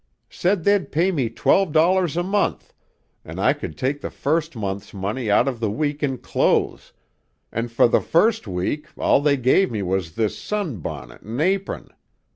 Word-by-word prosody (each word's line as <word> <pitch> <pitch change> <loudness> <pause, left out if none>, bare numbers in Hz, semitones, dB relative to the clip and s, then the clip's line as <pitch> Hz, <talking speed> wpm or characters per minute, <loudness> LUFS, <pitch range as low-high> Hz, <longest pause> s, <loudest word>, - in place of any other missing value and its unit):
Said 180 -1 0
they'd 200 -1 +2
pay 175 +5 +2
me 135 -10 0
twelve 180 +9 +2
dollars 170 +1 +3
a 175 - +1
month, 200 +2 -1 0.5
an' - - -9
I - - +3
could 75 - -7
take 140 +3 -1
the - - -4
first 155 +1 -1
month's 100 -2 -5
money 105 +5 -3
out 105 +4 +4
by 135 - +1
the 115 -4 -3
week 145 +7 -2
in 135 -3 0
clothes, - - 0 0.6
an' 115 +2 -2
for 115 +1 +3
the - - +2
first 210 - +2
week 95 +12 -2
all - - +3
they 145 -1 +3
gave 130 +10 +3
me 105 -4 -3
was 90 -3 -2
this 110 -2 0
sunbonnet 135 - -5
an' 115 +5 -5
apron. 190 +4 -1
140 Hz, 175 wpm, -22 LUFS, 110-175 Hz, 0.6 s, out